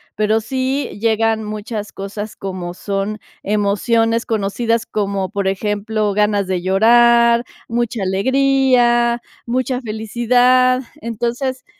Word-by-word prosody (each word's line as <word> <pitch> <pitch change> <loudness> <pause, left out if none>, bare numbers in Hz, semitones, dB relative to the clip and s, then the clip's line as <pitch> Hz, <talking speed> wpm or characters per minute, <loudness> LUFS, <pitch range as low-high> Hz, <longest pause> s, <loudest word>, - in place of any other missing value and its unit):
Pero, 215 +1 +1
sí 265 +3 -2
llegan 225 0 +1
muchas 215 0 -5
cosas 205 +2 -6
como 185 -2 -5
son 200 +2 -3 0.2
emociones 225 +3 +1
conocidas, 225 +1 -1
como, 200 -2 -2
por 200 -2 -2
ejemplo, 210 +2 -1
ganas 210 -1 +1
de 180 -2 -2
llorar, 235 +4 +4 0.2
mucha 235 -2 -2
alegría, 240 +2 +2 0.2
mucha 255 +1 -1
felicidad. 245 +3 +2 0.2
Entonces, 240 +3 -3
225 Hz, 100 wpm, -18 LUFS, 205-240 Hz, 0.2 s, llorar